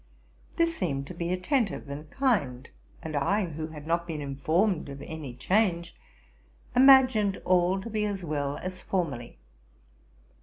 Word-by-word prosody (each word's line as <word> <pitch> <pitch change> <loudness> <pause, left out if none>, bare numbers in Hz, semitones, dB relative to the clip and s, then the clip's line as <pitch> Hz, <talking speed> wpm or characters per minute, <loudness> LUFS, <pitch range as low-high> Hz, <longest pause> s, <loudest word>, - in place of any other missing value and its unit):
This 335 -1 +2
seemed 140 - -2
to 160 - -8
be 170 0 -3
attentive 200 - 0
and 145 +2 -7
kind; 155 - 0 0.4
and 160 -1 -5
I 190 +9 +1
who 155 -1 -5
had 150 -2 -10
not 170 +1 0
been 160 -3 -4
informed 155 +6 0
of 140 0 -8
any 150 -6 -7
change, 170 - 0 0.8
imagined 255 -6 +6
all 180 +1 +3
to 195 - -7
be 215 -1 0
as 195 -3 -3
well 145 -2 -2
as 185 0 -5
formerly. 140 - -3
170 Hz, 145 wpm, -28 LUFS, 145-200 Hz, 0.8 s, imagined